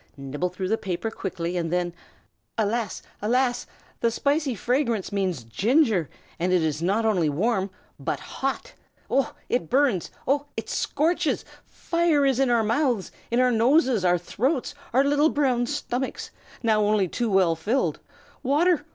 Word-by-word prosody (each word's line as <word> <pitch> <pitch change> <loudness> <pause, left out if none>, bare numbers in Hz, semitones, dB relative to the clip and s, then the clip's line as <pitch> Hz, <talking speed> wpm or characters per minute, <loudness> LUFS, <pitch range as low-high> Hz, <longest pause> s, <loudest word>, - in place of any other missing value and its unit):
Nibble 140 +6 -3
through 185 +1 -4
the 220 - +1
paper 190 +3 -3
quickly, 180 -4 -4
and 165 -2 -2
then 175 -1 0 0.6
Alas! 220 -1 -1 0.2
alas! 245 +3 +1 0.3
the 235 - +2
spicy 280 +2 0
fragrance 235 -2 0
means 185 -9 -1
ginger, 210 - +2 0.3
and 180 +2 +1
it 180 -3 +3
is 155 -1 -1
not 200 +6 +1
only 180 -8 +2
warm, 195 +5 0 0.3
but - - -2
hot. 270 0 -4 0.4
Oh, 270 -2 +1
it 170 -10 -1
burns! 260 - +2 0.2
oh, 285 +2 +1
it - - -4
scorches! 325 +4 0 0.2
fire 335 -4 +1
is 270 -2 +2
in 270 -2 +3
our 235 -2 +3
mouths, 235 -2 0 0.2
in 235 - +1
our 255 0 +4
noses, 245 - +3
our 180 -1 +4
throats, 250 - -1 0.2
our 260 +3 +4
little 290 +2 +3
brown 255 -5 +1
stomachs, 265 -2 -3 0.3
now 220 -2 +3
only 205 -2 +2
too 235 +6 -2
well 185 -4 +3
filled. 205 - 0 0.4
Water! 300 +4 +2
230 Hz, 150 wpm, -25 LUFS, 185-270 Hz, 0.6 s, our